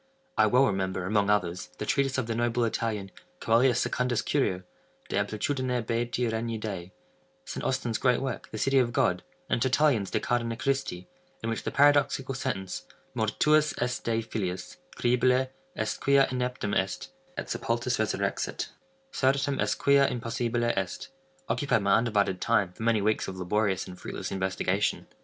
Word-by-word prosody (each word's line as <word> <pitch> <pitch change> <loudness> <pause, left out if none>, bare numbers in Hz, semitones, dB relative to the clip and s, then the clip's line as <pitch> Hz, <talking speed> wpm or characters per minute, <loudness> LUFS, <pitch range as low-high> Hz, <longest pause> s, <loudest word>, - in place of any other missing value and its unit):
I - - +5
well 130 +2 +5
remember, 95 -4 -1
among 100 +1 +2
others, 90 -4 0
the - - -4
treatise 135 +4 +1
of 130 - 0
the 115 - -2
noble 120 +1 +1
Italian, 110 -3 -2 0.3
Coelius 120 +2 +3
Secundus 125 -2 0
Curio, 95 -11 0 0.5
"De - - -2
Amplitudine 125 +5 0
Beati 120 +1 0
Regni 115 0 -2
Dei;" 95 -5 -5 0.5
St. - - -5
Austin's 125 -4 -1
great 125 -2 +3
work, 130 -3 -4
the 110 - -5
"City 135 +5 +3
of 120 -2 +1
God;" 115 -10 +2 0.3
and - - 0
Tertullian's 130 -5 +3
"De - - 0
Carne 115 -1 -1
Christi," 135 -10 -2 0.4
in 115 - -1
which 115 - -2
the - - -3
paradoxical 140 -2 +3
sentence 100 -8 -4 0.3
"Mortuus 150 +8 +2
est 125 0 -1
Dei 115 -1 0
filius; 95 -5 -4 0.2
credible 125 +2 +2 0.2
est 110 0 -2
quia 140 0 +5
ineptum 125 -4 -2
est: 95 0 -1 0.3
et - - -3
sepultus - - -1
resurrexit; - - -1 0.4
certum 135 - +1
est - - +1
quia 140 -1 +5
impossibile 120 0 -1
est," 95 -1 -3 0.4
occupied 135 -7 +1
my 100 0 +3
undivided 105 -5 +1
time, 100 -6 +2
for - - -13
many 110 -2 +2
weeks 110 +1 +1
of 95 - -6
laborious 95 +1 0
and 90 -1 -10
fruitless - - -5
investigation. 95 +1 0
115 Hz, 155 wpm, -28 LUFS, 100-130 Hz, 0.5 s, I